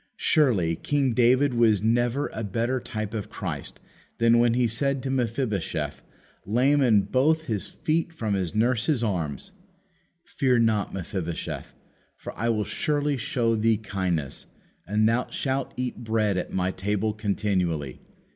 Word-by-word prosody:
Surely 100 - +2
King 135 - 0
David 125 +3 +4
was 110 -4 +3
never 120 +5 +1
a 110 - -4
better 115 +6 -1
type 110 -3 -5
of 105 -2 -4
Christ 85 -10 -5 0.4
than 115 0 +4
when 120 0 +3
he 125 -1 +3
said 135 +4 0
to 135 - -2
Mephibosheth, 115 - -2 0.4
lame 130 +7 +2
in 110 -6 +4
both 155 +8 +2
his 110 -9 -3
feet 165 +2 -1
from 110 -10 -2
his 95 0 -2
nurse's 120 +3 +2
arms: 85 - -3 0.7
"Fear 130 -2 +1
not, 110 -3 +2
Mephibosheth, 90 -3 -4 0.5
for - - -8
I 115 +3 -1
will 105 -2 +1
surely 145 -1 0
show 115 -2 0
thee 110 0 +2
kindness, 95 -9 -3 0.4
and 105 +3 +2
thou 115 +2 +1
shalt 135 -1 -2
eat 125 -1 -3
bread 110 -3 +1
at 90 - -3
my 95 0 0
table 105 +3 -1
continually." 95 - -1
115 Hz, 145 wpm, -26 LUFS, 100-125 Hz, 0.7 s, David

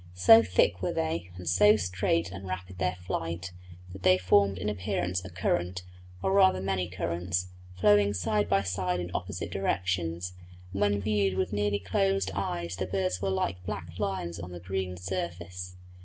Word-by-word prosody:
So 90 +5 +8
thick 90 -5 +2
were - - -1
they, 80 +2 -2
and 90 -1 -9
so 105 +6 +6
straight 90 -2 0
and 95 +1 -8
rapid 95 0 -6
their 90 -1 0
flight, 90 0 -4 0.4
that 95 - -9
they 90 0 +5
formed 95 +2 +3
in 95 +3 -3
appearance 90 -3 -1
a 95 - -8
current, 90 +1 -1 0.4
or - - +2
rather 190 - +5
many 95 -2 -1
currents, 90 0 -2 0.3
flowing 100 +1 +4
side 105 +3 0
by 100 0 +3
side 90 -1 -1
in 90 0 -4
opposite 90 0 -4
directions; 90 -2 -1 0.4
and 100 - -3
when 100 0 +3
viewed 100 -2 +1
with 95 +1 -1
nearly 105 0 +1
closed 95 0 0
eyes 85 -3 -3
the 95 - -2
birds 90 -1 -1
were 100 - 0
like 95 -1 -1
black 90 -4 -6
lines 85 -3 -2
on 90 - -6
the 90 - -7
green 90 0 -3
surface. 90 0 -5
90 Hz, 170 wpm, -29 LUFS, 90-95 Hz, 0.4 s, So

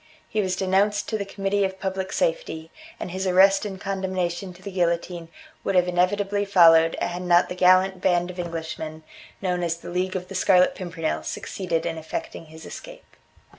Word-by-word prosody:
He 215 - 0
was 185 -2 -1
denounced 195 +2 +1
to 220 - -1
the 200 - -3
Committee 200 0 -1
of 190 0 -2
Public 190 0 -3
Safety, - - -2 0.3
and 180 - -5
his 190 +1 -2
arrest 195 +2 +5
and 190 -2 -7
condemnation 190 -2 -2
to 185 - -17
the 200 - -6
guillotine 170 -1 -1 0.3
would 195 - -1
have 180 0 +4
inevitably 195 +3 +1
followed 165 -4 +5
had 175 +1 -2
not 175 -1 +3
the 180 - -4
gallant 185 +1 +4
band 175 -1 +1
of 180 - -11
Englishmen, 160 -2 -5 0.4
known 180 -1 0
as 170 -1 -1
the 170 - -9
League 185 +2 -1
of 180 -1 -4
the 195 - -9
Scarlet 185 -1 +4
Pimpernel, 165 -3 -3
succeeded 170 -4 -3
in 165 -1 -3
effecting 160 +1 -6
his 160 +1 -12
escape. - - -11
185 Hz, 180 wpm, -24 LUFS, 175-195 Hz, 0.4 s, arrest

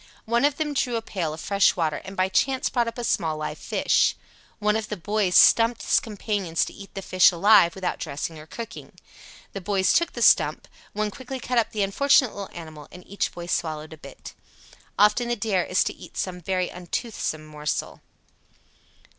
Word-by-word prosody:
One 235 +4 +2
of 290 -1 +1
them 300 -2 -2
drew 250 -3 0
a 230 - -1
pail 175 -8 -3
of 155 - -7
fresh 200 +3 +2
water 160 -4 -1
and 190 +1 -10
by 185 0 +2
chance 260 +7 +1
brought 240 -1 0
up 230 - -5
a 240 - -4
small 160 -8 0
live 155 - -5
fish. - - +1 0.4
One 210 0 +1
of 220 -1 -3
the 210 - -4
boys 200 0 0
"stumped" 230 +1 +5
his - - +3
companions 205 -6 -2
to - - -9
eat 200 -1 -13
the 195 - -5
fish 185 +1 +5
alive, 175 -1 +5
without 190 -2 -3
dressing 155 +1 -5
or 155 - -12
cooking. 230 +5 -9 0.6
The 195 - -5
boys 190 0 +1
took 340 0 +1
the - - -2
"stump," - - +4 0.3
one 210 0 -2
quickly 260 +3 -7
cut 245 0 0
up 230 - 0
the 210 -2 -1
unfortunate 260 +4 +3
little 200 -1 -7
animal 155 -3 -10
and 180 - -13
each 200 - -2
boy 175 - -8
swallowed 155 -2 -3
a - - -11
bit. - - -12 0.6
Often 210 +4 +4
the 240 - 0
dare 200 -5 0
is 185 - +2
to - - -3
eat - - -13
some 180 -1 -3
very 185 +1 -1
untoothsome 180 -3 -4
morsel. 150 -1 -4
195 Hz, 195 wpm, -24 LUFS, 170-230 Hz, 0.6 s, stumped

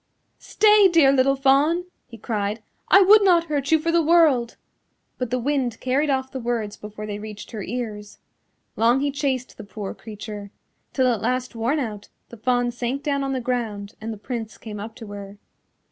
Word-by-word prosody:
"Stay, 420 -2 +5
dear 325 -6 +5
little 275 0 +3
Fawn," 280 +6 +3 0.2
he 230 - -12
cried, 210 0 -3 0.2
"I 390 - +7
would 415 +2 +7
not 350 -4 +5
hurt 290 -3 -2
you 320 - +6
for 330 +2 -1
the 335 0 +3
world." 310 -8 +3 0.6
But 250 -2 -2
the 250 - 0
wind 255 -2 -1
carried 275 +4 0
off 265 -1 -1
the 265 - -5
words 230 -4 -2
before 210 0 -8
they 205 -1 -5
reached 210 +1 -9
her 220 -3 -5
ears. 210 -1 -5 0.6
Long 235 +4 +3
he 285 0 0
chased 265 -3 -2
the 220 - -8
poor 205 -1 -6
creature, 210 -1 -8 0.4
till 260 - +1
at 235 -5 +1
last 255 +2 -1
worn 235 +7 0
out 215 -7 -5 0.2
the 235 - -11
Fawn 245 +2 +1
sank 245 +3 -3
down 280 -2 0
on 270 0 -2
the 260 - -1
ground 225 -4 -3
and 225 +1 -4
the 220 - -6
Prince 225 0 -6
came 210 -2 -8
up 220 +2 -7
to 225 - -10
her. 200 0 -9
245 Hz, 190 wpm, -23 LUFS, 215-280 Hz, 0.6 s, I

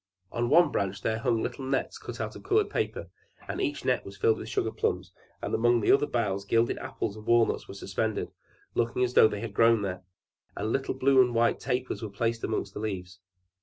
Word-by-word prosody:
On 120 0 -1
one 170 0 +6
branch 100 0 -2
there 110 0 0
hung 115 -2 +1
little 135 - -4
nets 135 0 -2
cut - - -8
out - - -4
of - - -9
colored 420 +1 +1
paper, - - -3 0.4
and - - -3
each 320 -6 -2
net 125 -1 +1
was 100 0 -10
filled 110 -1 +2
with 110 - -7
sugarplums; 110 -1 -1 0.3
and - - -3
among 120 +1 +3
the 105 - +3
other 145 +2 +4
boughs 100 -5 -1
gilded 115 +3 +1
apples 105 -2 -4
and 110 0 -12
walnuts 120 -1 +3
were - - -9
suspended, 100 +2 -2 0.4
looking 120 +2 0
as 125 0 0
though - - +7
they 105 -1 -4
had 115 -3 -5
grown 115 0 +4
there, 95 -2 -3 0.5
and 110 - -2
little 135 0 -1
blue 135 0 +5
and 125 -2 +1
white 115 0 +3
tapers 125 0 -2
were 110 - -4
placed 115 +3 -2
among 110 - -1
the - - -6
leaves. 95 -4 -5
115 Hz, 210 wpm, -28 LUFS, 105-125 Hz, 0.5 s, though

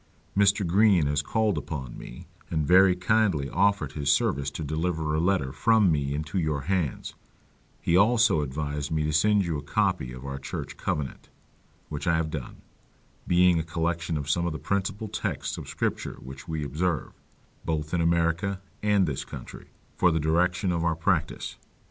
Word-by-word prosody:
Mr. 100 0 +3
Green 95 -2 +4
has 70 0 +1
called 110 +7 0
upon 65 -6 -6
me, - - -10 0.2
and 80 -3 0
very 95 +3 +6
kindly 90 -6 +2
offered 95 -6 +2
his 70 -1 0
service 70 -1 +1
to 80 - -6
deliver 80 +1 -1
a 80 - +1
letter 85 -7 +1
from 110 - +3
me 70 -2 0
into 75 +5 -2
your 75 -4 -1
hands; 85 -3 -2 0.7
he 85 - +1
also 110 -3 +4
advised 75 +1 -3
me 80 -1 0
to 75 0 -1
send 105 +5 +3
you 80 -4 -2
a - - -6
copy 65 -3 0
of 65 +2 -9
our 70 0 -5
church - - -6
covenant, 70 -3 -4 0.6
which 75 +3 -5
I 85 - +4
have 80 -1 -1
done: 70 -6 -7 0.6
being 90 -1 +4
a - - -1
collection 85 0 -2
of 70 -1 -4
some 85 +3 +1
of 85 - -2
the - - -4
principal 100 +4 -2
texts 105 - -3
of - - -9
scripture - - -2
which 65 +1 -10
we 80 -2 -3
observe, 75 +3 -2 0.5
both 75 -1 -2
in 85 - +2
America 85 +4 +1 0.2
and 105 -2 +3
this 70 -5 -3
country, - - -10 0.3
for 90 - +4
the 80 -1 +1
direction 90 +4 +1
of 85 -1 -1
our 85 -1 +1
practice. 85 0 -1
80 Hz, 175 wpm, -27 LUFS, 75-95 Hz, 0.7 s, very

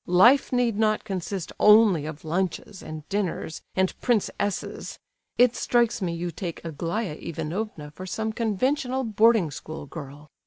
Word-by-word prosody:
Life 230 +11 +5
need 240 -4 +1
not 215 -1 +2
consist 190 -2 -4
only 210 -8 +6
of 155 0 -8
lunches, 180 +2 -2
and 155 -1 -8
dinners, 190 -5 -2
and 190 0 +2
Prince 235 -5 +2
S's. 205 -2 -3 0.4
It 245 -1 +5
strikes 235 -2 +1
me 180 -3 0
you 170 +1 -3
take 170 -2 -6
Aglaya 170 +5 -3
Ivanovna 165 -1 -4
for 185 +5 -9
some 220 +3 -2
conventional 255 +4 0
boarding 220 - +3
school 155 +1 -7
girl. 145 0 -10
190 Hz, 145 wpm, -26 LUFS, 165-225 Hz, 0.4 s, only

